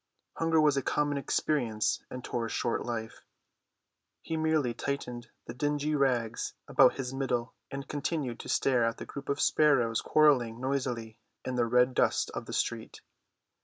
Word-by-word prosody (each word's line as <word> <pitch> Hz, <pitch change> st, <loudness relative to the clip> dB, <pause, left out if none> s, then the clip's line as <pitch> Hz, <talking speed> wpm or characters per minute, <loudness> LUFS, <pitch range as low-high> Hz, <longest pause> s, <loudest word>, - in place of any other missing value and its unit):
Hunger 165 Hz, -1 st, +2 dB
was 150 Hz, -2 st, +4 dB
a -, -, +2 dB
common 145 Hz, +1 st, 0 dB
experience 120 Hz, -7 st, 0 dB
in 125 Hz, 0 st, -7 dB
Tor's 115 Hz, -3 st, -3 dB
short 120 Hz, -, -1 dB
life; 115 Hz, -2 st, -5 dB, 1.0 s
he 160 Hz, -, -3 dB
merely 155 Hz, -6 st, +1 dB
tightened 125 Hz, -3 st, -4 dB, 0.2 s
the 120 Hz, -, -7 dB
dingy 145 Hz, +4 st, -1 dB
rags 125 Hz, -5 st, 0 dB
about -, -, +5 dB
his 130 Hz, -1 st, -4 dB
middle 125 Hz, -3 st, -2 dB, 0.2 s
and 135 Hz, -1 st, -6 dB
continued 145 Hz, -4 st, -3 dB
to -, -, -8 dB
stare 125 Hz, -3 st, +2 dB
at 115 Hz, 0 st, 0 dB
the -, -, -7 dB
group 140 Hz, -1 st, -8 dB
of 140 Hz, -, 0 dB
sparrows 130 Hz, -7 st, +3 dB
quarreling 125 Hz, -7 st, +3 dB
noisily 125 Hz, -4 st, -3 dB, 0.3 s
in 130 Hz, -, -2 dB
the 120 Hz, -2 st, +1 dB
red 125 Hz, +2 st, +3 dB
dust -, -, +1 dB
of -, -, -6 dB
the -, -, -6 dB
street. -, -, -3 dB
130 Hz, 160 wpm, -30 LUFS, 120-145 Hz, 1.0 s, about